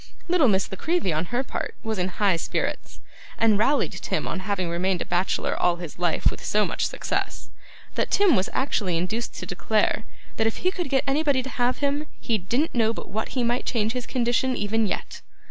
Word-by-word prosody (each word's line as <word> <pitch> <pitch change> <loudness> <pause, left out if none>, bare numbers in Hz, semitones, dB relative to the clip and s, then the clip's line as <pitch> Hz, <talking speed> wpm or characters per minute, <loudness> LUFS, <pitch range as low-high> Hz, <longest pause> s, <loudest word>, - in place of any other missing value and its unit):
Little 345 -6 +4
Miss 195 -3 +2
La - - -3
Creevy, 330 - +1
on 155 +3 0
her 245 +8 -1
part, - - -4
was 220 -3 -2
in 180 - +1
high 190 0 +2
spirits, 165 - -3 0.4
and 220 -3 +4
rallied 275 +7 +3
Tim - - -2
on - - -2
having 190 -2 -1
remained 175 +2 0
a - - -16
bachelor 180 +2 0
all 175 -1 +2
his 170 -2 -8
life 175 -2 +2
with - - -9
so 210 0 +2
much - - 0
success, - - -3 0.4
that - - 0
Tim 400 -8 +5
was 185 -1 +1
actually 205 -10 0
induced 215 +7 -2
to - - -5
declare, 210 +4 +1 0.3
that 220 - +3
if 225 - -2
he 365 - +4
could 355 -6 -3
get 265 0 +2
anybody 280 -2 +2
to 265 - -6
have 250 +3 0
him, 290 +2 -1
he 225 -4 0
didn't 240 - 0
know 225 -2 +2
but - - -8
what 220 +6 -3
he 250 - +2
might 240 +1 0
change 220 -2 +1
his 250 0 -4
condition 250 +1 +1
even 215 +1 +1
yet. - - -4
225 Hz, 210 wpm, -25 LUFS, 190-260 Hz, 0.4 s, Tim